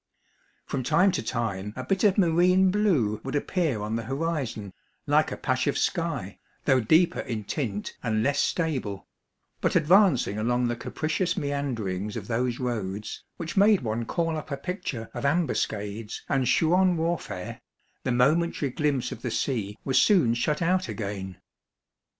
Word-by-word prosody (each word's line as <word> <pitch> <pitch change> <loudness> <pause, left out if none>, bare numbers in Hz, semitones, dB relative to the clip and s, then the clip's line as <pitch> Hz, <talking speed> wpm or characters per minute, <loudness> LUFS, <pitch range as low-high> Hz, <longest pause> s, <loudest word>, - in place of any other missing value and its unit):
From 135 - -2
time 170 +9 +3
to 180 - -1
time 105 -4 -3
a 130 - -5
bit 195 +8 0
of 205 -1 +4
marine 180 +1 +4
blue 160 - +1
would 135 +2 -4
appear 145 - 0
on 105 +1 -2
the 115 - -1
horizon, 135 - -3 0.3
like - - +3
a - - -4
patch - - 0
of - - +1
sky, - - -2 0.3
though 130 - +4
deeper 160 +9 +3
in 110 -3 -4
tint 105 -3 -3
and 110 -2 0
less 140 +2 +1
stable; 130 - -1 0.6
but - - +1
advancing 165 - +4
along 120 +2 +1
the 120 - -1
capricious 170 +8 -2
meanderings 115 -9 -2
of 100 -3 -6
those 120 +1 -1
roads, 105 -5 -4
which 165 -2 -5
made 205 0 +5
one 115 0 -2
call 165 +5 -1
up 155 - -7
a 140 - -3
picture 140 - -5
of - - -5
ambuscades 110 -9 -1
and 135 -2 +1
Chouan 180 +2 +3
warfare, 160 - -3 0.4
the 130 - 0
momentary 140 +3 +2
glimpse 145 -2 0
of - - -7
the - - -2
sea 105 -6 -2
was 130 - +4
soon 175 - +4
shut 150 +7 0
out 185 +2 +1
again. 100 -3 -5
135 Hz, 155 wpm, -26 LUFS, 110-170 Hz, 0.6 s, made